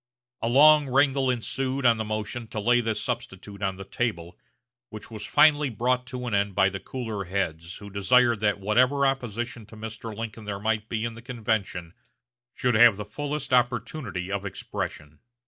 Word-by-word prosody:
A 115 - 0
long 150 +3 +7
wrangle 135 0 +3
ensued 130 +2 -2
on 115 -1 +5
the 110 - -2
motion 110 +2 -4
to 110 - -5
lay 120 +3 +3
this 115 -2 -1
substitute 105 -5 -5
on 95 -1 -1
the 95 - -8
table, 90 -7 -3 0.5
which 110 0 -10
was 110 -1 -6
finally 150 -2 +5
brought 125 +2 0
to 125 -1 -6
an 120 - -3
end 100 -1 +1
by 95 - +4
the 95 0 -6
cooler 110 -6 -5
heads, 85 -3 -3
who 100 -1 -11
desired 120 +3 +3
that 105 -1 +1
whatever 125 +8 +3
opposition 120 -4 -2
to 110 - -13
Mr. 110 0 -7
Lincoln 115 -1 -6
there 100 -1 -3
might 110 +1 -1
be 115 -1 -2
in 115 - -3
the 115 - -11
convention 110 -8 -3 0.6
should 125 -1 +1
have 110 -2 +5
fullest 145 -2 -3
opportunity 125 - 0
of 100 -1 -2
expression. 75 -5 -6
115 Hz, 175 wpm, -26 LUFS, 100-125 Hz, 0.6 s, long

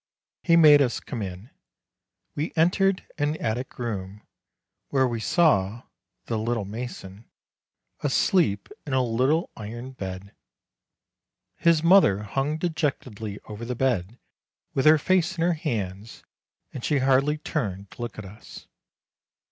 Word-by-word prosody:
He 170 - +4
made 150 -3 +8
us 125 -3 +1
come 120 - -6
in. 95 +4 -7 0.8
We 150 +3 -3
entered 185 +3 +2
an 145 +1 +1
attic 120 +2 -3
room, 105 -4 -5 0.7
where 130 -2 +2
we 120 -2 -3
saw 115 - +2 0.4
"the 115 - -2
little 115 -1 -1
mason" 105 -2 -8 0.7
asleep 145 - +1 0.2
in 140 - -3
a 130 -1 +3
little 130 +8 +1
iron 120 +4 -7
bed; 95 -4 -7 1.2
his 165 -2 +3
mother 170 - +5
hung 135 +8 -1
dejectedly 130 - -3
over 105 +2 -8
the 125 +1 -3
bed, 120 -4 -1 0.6
with 135 +2 +2
her 155 +1 +8
face 185 +2 +1
in 165 - 0
her 175 +1 +3
hands, 110 - -4 0.5
and 125 - -7
she 150 - +1
hardly 135 +3 +2
turned 100 - -4
to - - -11
look 120 -3 -5
at 105 - -7
us. 100 +3 -12
125 Hz, 130 wpm, -25 LUFS, 105-150 Hz, 1.2 s, made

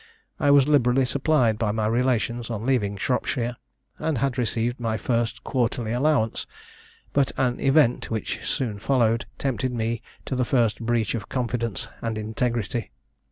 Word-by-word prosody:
I 145 - +3
was 140 -1 +6
liberally 130 -3 +4
supplied 130 -5 +2
by 110 -3 +1
my 110 0 -1
relations 120 0 0
on 115 -1 -4
leaving 105 -7 +1
Shropshire, 120 +1 -1 0.4
and 160 -4 0
had 135 +1 0
received 120 0 -1
my 115 -2 -1
first 115 0 -1
quarterly 120 -3 -1
allowance; 125 -2 +1 0.7
but 140 -1 +2
an 125 -2 +1
event, 135 -3 +3
which 110 -2 -3
soon 115 -7 -2
followed, 115 -1 +2
tempted 130 -1 -1
me 115 -1 -2 0.2
to 135 - -2
the 125 - +1
first 120 -3 +2
breach 115 -2 0
of 110 -4 -4
confidence 115 -4 -2
and 115 -1 -2
integrity. 110 0 -2
120 Hz, 150 wpm, -25 LUFS, 115-130 Hz, 0.7 s, was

